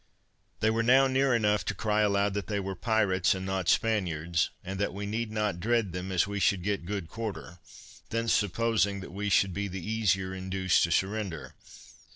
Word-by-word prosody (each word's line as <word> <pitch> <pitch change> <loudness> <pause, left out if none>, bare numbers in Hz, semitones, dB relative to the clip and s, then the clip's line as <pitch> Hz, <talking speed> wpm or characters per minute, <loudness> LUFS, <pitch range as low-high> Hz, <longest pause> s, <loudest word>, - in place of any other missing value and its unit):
They 110 - +3
were 115 +1 +1
now 130 +4 +5
near 130 -1 +2
enough 105 -4 +2
to - - -2
cry 105 -1 +1
aloud 100 -1 +2
that 100 -3 -3
they 105 -2 -1
were 95 0 -3
pirates, 100 -3 +1
and 95 0 -5
not 95 -2 -1
Spaniards, 85 -7 +1
and 95 +1 -5
that 100 -2 -1
we 100 +1 -4
need 110 +2 -2
not 105 -4 -1
dread 110 -2 0
them, 90 +1 -4
as 90 -2 +2
we 100 0 -4
should 95 -2 +2
get 100 -3 -2
good 100 -4 -3
quarter; 105 -4 -6 0.5
thence 115 0 0
supposing 105 0 +1
that 85 - -10
we 105 +1 -2
should 95 -1 +3
be 100 +2 -2
the 95 -2 -6
easier 95 -4 0
induced 95 0 +1
to 85 - -5
surrender. 95 -2 -2
100 Hz, 190 wpm, -29 LUFS, 95-110 Hz, 0.5 s, now